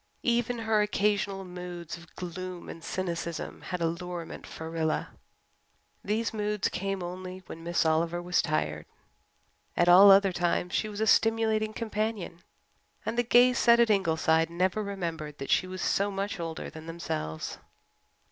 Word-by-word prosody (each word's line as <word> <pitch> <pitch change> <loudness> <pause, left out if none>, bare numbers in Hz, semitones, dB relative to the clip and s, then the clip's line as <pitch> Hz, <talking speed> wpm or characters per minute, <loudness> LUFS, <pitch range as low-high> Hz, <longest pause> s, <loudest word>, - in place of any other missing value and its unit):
Even 240 0 +1
her 220 -2 +2
occasional 205 -2 0
moods 180 -2 -7
of 170 -1 -15
gloom 180 0 -6
and 165 - -9
cynicism 170 -3 -4
had 180 -2 -5
allurement 170 0 -4
for 160 - -7
Rilla. 160 -1 -1 0.9
These 220 +3 -1
moods 210 -1 0
came 195 -1 -3
only 185 +1 -7
when 165 - -9
Miss 170 0 +1
Oliver 165 +2 +1
was 180 +1 +1
tired. 75 0 -2 0.9
At 175 - +4
all 185 +3 +9
other 195 -1 +6
times 175 +1 0
she 215 - 0
was 210 0 -5
a - - +3
stimulating 220 -1 +3
companion, 215 -5 -3 0.7
and 225 - -2
the 240 - +3
gay 245 +1 +5
set 235 -1 +5
at 235 -2 +5
Ingleside 160 -4 +2
never 185 +4 0
remembered 165 -7 -4
that 135 - -5
she 185 - +3
was 185 -1 -5
so 200 +1 +1
much 200 0 -3
older 165 -1 -4
than 160 0 -10
themselves. 80 - -4
185 Hz, 150 wpm, -29 LUFS, 170-210 Hz, 0.9 s, all